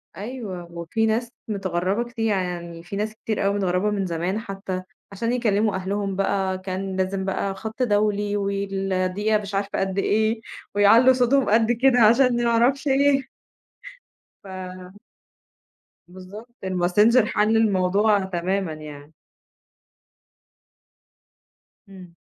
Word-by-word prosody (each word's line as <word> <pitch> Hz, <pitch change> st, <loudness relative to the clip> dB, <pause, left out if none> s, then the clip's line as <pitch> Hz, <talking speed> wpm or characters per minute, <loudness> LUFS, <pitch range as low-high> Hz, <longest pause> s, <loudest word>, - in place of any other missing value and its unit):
أيوه 195 Hz, -5 st, -7 dB
وفي 170 Hz, +7 st, -2 dB
ناس 225 Hz, +2 st, 0 dB, 0.2 s
متغرّبة 195 Hz, +2 st, -2 dB
كتير، 230 Hz, -2 st, -3 dB
يعني 175 Hz, -5 st, -3 dB
في 175 Hz, +3 st, -7 dB
ناس 215 Hz, +1 st, -3 dB
كتير 215 Hz, -2 st, -3 dB
أوي 200 Hz, -, +2 dB
متغرّبة 190 Hz, +1 st, 0 dB
من 200 Hz, -2 st, -1 dB
زمان 175 Hz, +4 st, -2 dB
حتّى 195 Hz, -3 st, -5 dB, 0.3 s
عشان 230 Hz, +4 st, -2 dB
يكلّموا 215 Hz, -4 st, +1 dB
أهلهم 195 Hz, +1 st, -2 dB
بقى، 195 Hz, -1 st, 0 dB
كان 190 Hz, 0 st, -4 dB
لازم 190 Hz, 0 st, -1 dB
بقى 195 Hz, 0 st, -2 dB
خَط 220 Hz, +5 st, -4 dB
دولي 205 Hz, -2 st, +1 dB
والدقيقة 195 Hz, +1 st, -1 dB
مش 200 Hz, 0 st, -6 dB
عارفة 200 Hz, 0 st, -2 dB
قد 195 Hz, 0 st, -2 dB
إيه 220 Hz, +2 st, +1 dB, 0.3 s
ويعلّوا 225 Hz, +6 st, +6 dB
صوتهم 255 Hz, +1 st, +2 dB
قد 225 Hz, +2 st, +3 dB
كده 245 Hz, +1 st, +3 dB
عشان 240 Hz, +2 st, +4 dB
ما 235 Hz, -, +2 dB
أعرفش 250 Hz, +5 st, +2 dB
إيه. 275 Hz, 0 st, +3 dB, 1.2 s
ف 185 Hz, -1 st, -9 dB, 1.1 s
بالضبط، 195 Hz, +6 st, -12 dB
الماسنجر 190 Hz, +6 st, +3 dB
حَل 215 Hz, +1 st, +2 dB
الموضوع 205 Hz, 0 st, +3 dB
تمامًا 185 Hz, -1 st, -2 dB
يعني. 150 Hz, 0 st, -11 dB, 2.8 s
إمم. 180 Hz, -3 st, -13 dB
200 Hz, 120 wpm, -23 LUFS, 185-225 Hz, 2.8 s, ويعلّوا